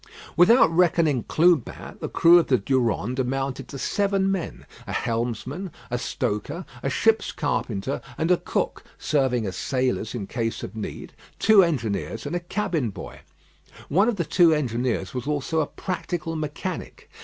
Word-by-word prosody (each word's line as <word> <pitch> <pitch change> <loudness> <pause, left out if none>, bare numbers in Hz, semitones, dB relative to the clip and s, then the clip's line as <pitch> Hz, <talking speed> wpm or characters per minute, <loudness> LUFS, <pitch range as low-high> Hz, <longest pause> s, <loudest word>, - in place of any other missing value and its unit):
Without 180 +2 +6
reckoning 165 -6 +3
Clubin, 165 -4 +1
the - - -4
crew 170 +1 +6
of 170 - 0
the 130 - +4
Durande 120 - 0
amounted 135 0 -2
to 140 - -8
seven 195 +4 +1
men; 190 -4 -4 0.2
a - - -5
helmsman, 125 - -2 0.2
a 125 - -1
stoker, 140 - -3 0.2
a 135 - -1
ship's 225 +8 +2
carpenter, 130 -4 -2 0.2
and 165 +3 +1
a 180 - +5
cook - - -2
serving 130 -6 +1
as 95 - -4
sailors 130 -4 -1
in 105 -5 -4
case 115 +1 -3
of 100 - -7
need 110 - -6 0.2
two 215 -2 +6
engineers, 115 - -2
and - - -3
a - - +1
cabin 175 - -2
boy. 95 -3 -9 0.7
One 200 +9 +4
of 235 - 0
the 170 -4 -2
two 170 0 +5
engineers 120 -7 -1
was 125 +1 -4
also 150 +2 -1
a 150 - +1
practical 175 -3 -4
mechanic. 155 +3 -5
145 Hz, 155 wpm, -24 LUFS, 120-175 Hz, 0.7 s, Without